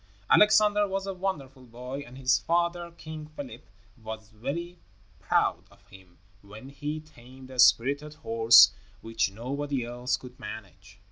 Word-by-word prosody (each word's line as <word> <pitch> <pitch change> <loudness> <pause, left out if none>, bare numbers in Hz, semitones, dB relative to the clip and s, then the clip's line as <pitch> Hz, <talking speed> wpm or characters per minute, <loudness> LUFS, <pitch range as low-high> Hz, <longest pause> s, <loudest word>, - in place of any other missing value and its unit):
Alexander 210 -1 +5
was 195 0 -3
a 195 - -4
wonderful 145 -9 -5
boy, 125 +3 -8
and 130 -3 -11
his 130 -1 +2
father, 170 0 -1
King 155 -2 -9
Philip, 275 -3 -9 0.3
was 110 0 -8
very 170 +11 -5 0.4
proud - - 0
of 100 0 -24
him 95 -3 -17 0.2
when 105 +6 -12
he 145 +2 -5
tamed 130 -3 -15
a 130 - -9
spirited 140 +5 +3
horse 115 -7 +6 0.3
which 115 -2 -1
nobody 135 +4 -3
else 120 +1 -2
could 125 0 -13
manage. 105 -1 -10
130 Hz, 140 wpm, -27 LUFS, 115-155 Hz, 0.4 s, horse